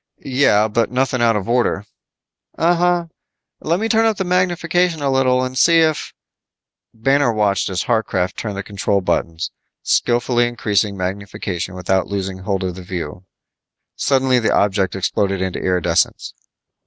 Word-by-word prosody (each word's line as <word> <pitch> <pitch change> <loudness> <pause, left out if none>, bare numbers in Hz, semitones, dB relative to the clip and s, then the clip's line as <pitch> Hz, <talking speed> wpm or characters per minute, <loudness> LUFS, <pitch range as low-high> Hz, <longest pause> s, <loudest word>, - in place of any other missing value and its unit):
"Yeah, 125 -6 +3
but 115 +1 0
nothing 130 0 0
out 115 -1 +3
of 100 -2 -3
order." 120 -4 +1 0.7
"Uh 170 +2 +3
huh. 175 0 +1 0.5
Let 170 +3 0
me 220 - 0
turn 225 0 +3
up 220 -2 0
the 190 - -1
magnification 175 -2 +1
a 140 - +1
little 130 -1 +2
and 130 0 -4
see 165 +4 +5
if 155 -2 0 0.4
" - - -69
Banner 135 +3 +2
watched 105 -4 +1
as 95 -1 -2
Harcraft 105 -6 0
turned 100 -2 -5
control 100 -1 -1
buttons, 85 -2 -2 0.3
skillfully 120 0 +2
increasing 105 -4 -1
magnification 95 -1 -4
without 95 +1 0
losing 95 -2 -3
the 95 - -12
held 95 -2 -1
of 90 -1 -4
view. 90 -1 -6 0.7
Suddenly, 130 -2 +2
the 115 - +1
object 100 -2 +1
exploded 95 +1 -1
into 95 -1 -2
iridescence. 90 -2 0
110 Hz, 150 wpm, -19 LUFS, 95-135 Hz, 0.7 s, see